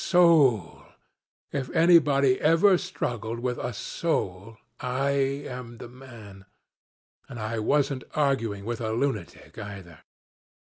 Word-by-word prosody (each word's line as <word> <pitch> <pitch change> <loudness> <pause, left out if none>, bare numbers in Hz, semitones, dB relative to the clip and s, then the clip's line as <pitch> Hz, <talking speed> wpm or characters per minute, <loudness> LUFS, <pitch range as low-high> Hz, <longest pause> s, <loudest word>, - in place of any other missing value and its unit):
Soul! 150 - +3 0.7
If 135 -3 -3
anybody 150 -6 +5
had - - -14
ever 175 +4 +4
struggled 120 - -4
with 125 0 -3
a - - -3
soul, 110 - -3 0.2
I 130 +3 -1
am 135 -3 -3
the 120 - -10
man. 115 -7 -13 0.8
And 120 - -8
I 110 +1 -3
wasn't 135 +3 0
arguing 115 -9 0
with 120 +1 -4
a 110 -1 -2
lunatic 115 - -4
either. 100 -6 -9
125 Hz, 115 wpm, -26 LUFS, 110-140 Hz, 0.8 s, anybody